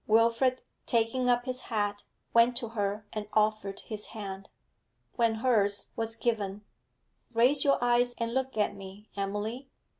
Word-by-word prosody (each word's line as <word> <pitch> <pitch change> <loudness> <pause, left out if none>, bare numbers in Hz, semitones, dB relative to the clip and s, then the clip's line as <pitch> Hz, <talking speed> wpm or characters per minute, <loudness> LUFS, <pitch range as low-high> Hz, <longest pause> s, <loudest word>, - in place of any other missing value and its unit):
Wilfrid, 230 +4 +3 0.2
taking 240 +2 +1
up 245 0 +3
his 255 -1 -2
hat, 205 -2 -1 0.3
went 235 +1 +5
to 235 -3 -2
her 205 -1 -2
and 210 -1 -4
offered 215 -2 +1
his 215 -2 -7
hand. 195 -1 -6 0.7
When 230 -2 +2
hers 205 -4 +1
was 225 0 -2
given: 210 -4 -1 0.7
'Raise 255 +5 +5
your 280 -1 +4
eyes 245 0 +3
and 230 0 -2
look 265 -2 -1
at 210 -1 +1
me, 195 +2 -11
Emily.' 210 +6 -3
225 Hz, 145 wpm, -30 LUFS, 205-245 Hz, 0.7 s, went